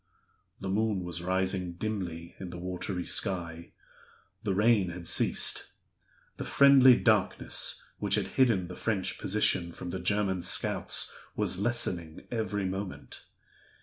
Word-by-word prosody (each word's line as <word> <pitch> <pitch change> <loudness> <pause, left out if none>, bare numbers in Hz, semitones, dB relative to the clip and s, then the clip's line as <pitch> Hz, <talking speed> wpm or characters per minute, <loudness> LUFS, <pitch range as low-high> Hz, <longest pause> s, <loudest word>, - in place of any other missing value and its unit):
The 95 - -6
moon 105 -1 0
was 85 -1 -4
rising 95 0 -1
dimly 85 -4 -5
in 95 - -6
the 90 - -8
watery 90 0 -4
sky; 85 -3 -1 0.7
the 100 -3 -1
rain 105 -2 +3
had 85 0 -8
ceased; - - +2 0.6
the - - -4
friendly 135 -2 +7
darkness - - 0 0.2
which - - +1
had - - -1
hidden 115 -9 +2
the 90 - -8
French 105 -5 -1
position 95 -3 +1
from 90 +1 -7
the - - -4
German 100 -3 0
scouts - - +1 0.2
was 90 - +1
lessening 90 -8 -1
every 105 -4 -2
moment. 95 0 -6
95 Hz, 130 wpm, -29 LUFS, 90-105 Hz, 0.7 s, friendly